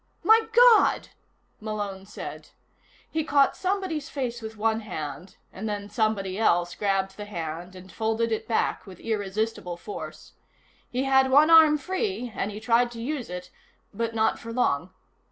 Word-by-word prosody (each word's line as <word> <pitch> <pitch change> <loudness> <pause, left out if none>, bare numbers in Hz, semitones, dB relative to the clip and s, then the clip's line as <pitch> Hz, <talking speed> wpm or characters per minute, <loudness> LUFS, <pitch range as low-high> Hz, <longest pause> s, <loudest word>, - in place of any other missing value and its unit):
"My 445 +1 +5
God!" 475 -2 +5 0.5
Malone 205 -3 -5
said. 155 -6 -8 0.6
He 315 0 0
caught 280 -2 +3
somebody's 370 -6 -2
face 245 -4 -4
with 220 0 -8
one 220 +1 +1
hand 175 -4 -7 0.2
and 215 +3 -5
then 205 0 -5
somebody 210 -3 0
else 175 -5 +2
grabbed 195 -1 -1
the 210 - -6
hand 175 -1 -6
and 185 0 -12
folded 225 +3 -1
it 220 - -2
back 225 -2 0
with 185 -2 -11
irresistible 210 -3 -3
force. 205 +4 -8 0.6
He 255 +2 -1
had 265 -1 +4
one 295 +4 +6
arm 315 -2 +8
free, 370 - -3
and 200 - -2
he 210 0 -7
tried 235 +2 +3
to 230 - -8
use 260 +1 -4
it 180 0 -7 0.4
but 230 +2 -3
not 220 0 +1
for 230 - -8
long. 180 - 0
220 Hz, 155 wpm, -26 LUFS, 195-265 Hz, 0.6 s, arm